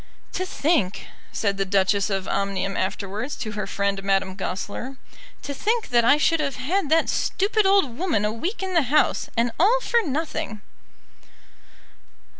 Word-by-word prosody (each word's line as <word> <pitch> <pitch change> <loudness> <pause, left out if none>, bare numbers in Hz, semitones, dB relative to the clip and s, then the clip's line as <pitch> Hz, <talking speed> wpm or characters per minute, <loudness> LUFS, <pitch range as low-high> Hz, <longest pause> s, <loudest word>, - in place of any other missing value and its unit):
"To 370 - -2
think," 285 - 0 0.3
said 200 -2 -1
the 195 - +1
Duchess 195 +1 +2
of 195 -2 -2
Omnium 195 0 -1
afterwards 200 +7 -3
to 215 - -5
her 210 0 -4
friend 200 0 -1
Madame 195 -1 +1
Goesler, 200 +7 -5 0.5
"to 285 - -4
think 445 - -1
that 240 -1 +4
I 260 +5 +5
should 325 +2 +2
have 280 -3 -1
had 310 +6 -1
that 325 +1 +3
stupid 410 +1 +1
old 385 -12 +3
woman 315 - +1
a 210 - 0
week 360 - -3
in 380 -1 -3
the 335 - +5
house, 300 - +2
and 235 +1 +2
all 440 +9 +5
for 475 -1 +2
nothing!" 305 - -3
245 Hz, 160 wpm, -24 LUFS, 200-330 Hz, 0.5 s, I